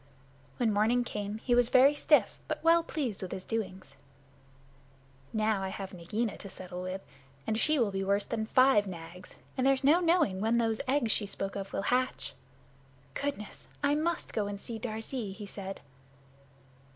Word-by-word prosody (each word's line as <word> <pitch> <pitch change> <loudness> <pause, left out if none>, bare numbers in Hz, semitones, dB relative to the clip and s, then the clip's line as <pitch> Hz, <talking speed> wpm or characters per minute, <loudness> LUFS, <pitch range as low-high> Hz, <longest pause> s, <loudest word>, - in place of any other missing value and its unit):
When 225 -3 +2
morning 225 +4 +3
came 210 -2 -4
he 245 +2 0
was 245 0 +4
very 270 +3 +6
stiff, 290 -6 +3
but 310 0 -3
well 335 +1 +6
pleased 275 -11 -3
with 185 - -5
his 185 - -5
doings. 190 -11 -4 1.3
"Now 215 -2 +1
I 190 - -2
have 195 0 -6
Nagaina 205 +6 -3
to 200 - -7
settle 180 -1 -7
with, 185 +1 -5 0.4
and 220 - 0
she 305 +7 +3
will 230 -6 +2
be 195 0 -2
worse 200 +1 +1
than 220 -1 -3
five 255 -5 +5
Nags, 180 0 -9 0.2
and 260 0 +2
there's 270 0 +3
no 300 +6 +6
knowing 330 - +2
when 225 +2 +2
the 225 -2 +1
eggs 260 -5 +2
she 205 - +2
spoke 195 0 -4
of 195 -1 -5
will - - -2
hatch. 255 +3 0 0.8
Goodness! 280 -7 -5 0.2
I 285 0 +4
must 320 +3 -1
go 210 -2 0
and 200 -1 -5
see 225 +2 -5
Darzee," 220 -1 -4
he 205 +1 -8
said. 195 -1 -7
220 Hz, 175 wpm, -30 LUFS, 195-255 Hz, 1.3 s, very